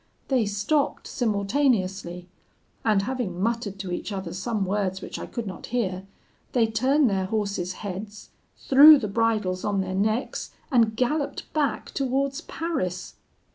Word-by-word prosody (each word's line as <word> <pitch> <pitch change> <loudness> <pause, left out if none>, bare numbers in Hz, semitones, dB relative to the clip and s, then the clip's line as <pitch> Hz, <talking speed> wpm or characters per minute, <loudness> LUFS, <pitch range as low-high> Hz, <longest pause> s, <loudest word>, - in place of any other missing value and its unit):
They 250 -6 +2
stopped 210 +9 0
simultaneously, 200 -6 0 0.6
and 210 -3 +3
having 240 -7 -3
muttered 225 -1 -1
to 195 -2 -5
each 175 - -4
other 190 -4 -4
some 205 +2 -2
words 190 -1 -1
which - - -7
I - - -6
could 235 - -5
not 185 -3 -7
hear, 195 -6 -2 0.5
they 240 -3 +4
turned 260 +6 +2
their 195 -3 0
horses' 200 -3 -2
heads, 205 +2 -7 0.3
threw 295 +3 +8
the 230 -6 -2
bridles 210 -4 0
on 200 -2 0
their 185 0 -3
necks, 215 +6 -1 0.2
and 225 -4 +3
galloped 280 +5 -1
back 295 -3 -1
towards 275 +1 -1
Paris. 185 - -3
210 Hz, 140 wpm, -25 LUFS, 190-250 Hz, 0.6 s, threw